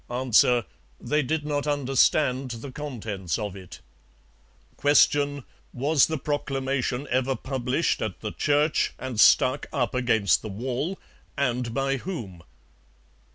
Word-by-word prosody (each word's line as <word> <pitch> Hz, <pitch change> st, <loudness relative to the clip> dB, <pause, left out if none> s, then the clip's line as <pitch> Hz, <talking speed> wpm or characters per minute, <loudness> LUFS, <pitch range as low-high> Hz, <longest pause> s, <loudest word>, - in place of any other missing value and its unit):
A. 120 Hz, -1 st, +3 dB, 0.3 s
They 150 Hz, +1 st, 0 dB
did 150 Hz, +2 st, -2 dB
not 145 Hz, -1 st, -2 dB
understand 135 Hz, -1 st, +2 dB
the 120 Hz, +3 st, -7 dB
contents 110 Hz, -, -4 dB
of 105 Hz, -3 st, -4 dB
it. 95 Hz, -3 st, -11 dB, 1.0 s
Q. 145 Hz, -1 st, +3 dB, 0.3 s
Was 140 Hz, +3 st, +3 dB
the 160 Hz, -, -2 dB
proclamation 135 Hz, -2 st, -2 dB
ever 130 Hz, +1 st, +1 dB
published 130 Hz, +4 st, -1 dB
at 110 Hz, -4 st, -4 dB
the 105 Hz, -, -4 dB
church 150 Hz, +1 st, +1 dB
and 125 Hz, -3 st, -5 dB
stuck 130 Hz, -, +5 dB
up 125 Hz, -5 st, -1 dB
against 115 Hz, -7 st, +2 dB
the 110 Hz, -, -7 dB
wall, 130 Hz, -, -3 dB, 0.4 s
and 125 Hz, -3 st, -1 dB
by 135 Hz, 0 st, 0 dB
whom? 115 Hz, -, -7 dB
130 Hz, 120 wpm, -25 LUFS, 120-145 Hz, 1.0 s, stuck